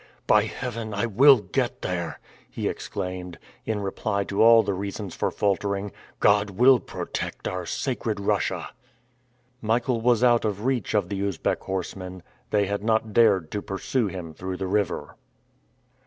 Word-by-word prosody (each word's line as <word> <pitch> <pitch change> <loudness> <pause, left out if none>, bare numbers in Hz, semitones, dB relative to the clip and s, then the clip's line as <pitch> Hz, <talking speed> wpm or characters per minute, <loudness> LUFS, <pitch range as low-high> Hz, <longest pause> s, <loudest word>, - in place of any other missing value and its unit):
"By 105 0 +4
Heaven, 115 -2 -5
I 100 - 0
will 125 +3 +6
get 95 -4 -2
there!" 85 -3 -3 0.3
he - - -3
exclaimed, 90 -2 -5 0.3
in 110 -2 -1
reply 100 +1 -1
to 100 - -1
all 115 0 +8
the 100 - -1
reasons 100 0 -5
for - - -1
faltering. 100 0 -1 0.3
"God 105 0 +4
will 125 +6 +5
protect - - -5
our 90 -2 -4
sacred 115 -5 -2
Russia." 100 - -1 0.9
Michael 115 +2 0
was 120 0 +3
out 120 -2 +5
of 105 0 -2
reach 125 -6 0
of 100 -4 +1
the 100 -1 -3
Usbeck 100 -4 -1
horsemen. 95 -1 -5 0.3
They 105 -1 +2
had 100 +1 -3
not 110 -1 +1
dared 100 -8 +4
to 105 - -2
pursue 105 +5 -1
him 90 -4 -6
through 90 +3 -5
the 95 - -3
river. 100 +2 -1
100 Hz, 155 wpm, -25 LUFS, 95-115 Hz, 0.9 s, all